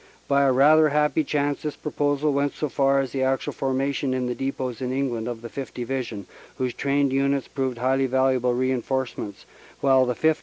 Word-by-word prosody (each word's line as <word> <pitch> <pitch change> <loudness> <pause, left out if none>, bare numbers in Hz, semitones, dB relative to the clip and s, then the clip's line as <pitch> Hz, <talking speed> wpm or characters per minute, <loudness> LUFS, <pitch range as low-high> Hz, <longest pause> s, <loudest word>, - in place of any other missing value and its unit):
By 140 0 +3
a 135 - +4
rather 150 +4 +5
happy 150 +1 +2
chance 145 0 -1
this 150 -1 -4
proposal 145 -1 0
went 140 0 0
so 150 - -2
far 135 0 +2
as 135 - -4
the 135 - -2
actual 130 0 0
formation 135 0 -1
in 130 -1 -1
the 125 - -1
depots 130 -2 -4
in 125 -1 -2
England 125 -4 -2
of 120 -1 -5
the - - -5
5th. 135 +3 -7
Division, 120 -5 -4 0.3
whose 130 -2 -1
trained 140 -1 +1
units 140 0 +1
proved 130 -3 -3
highly 130 +2 +1
valuable 130 -1 +2
reinforcements, 130 -4 -2 0.3
while 130 -2 +4
the 125 - -1
5th. 160 +3 +2
135 Hz, 190 wpm, -24 LUFS, 125-140 Hz, 0.3 s, rather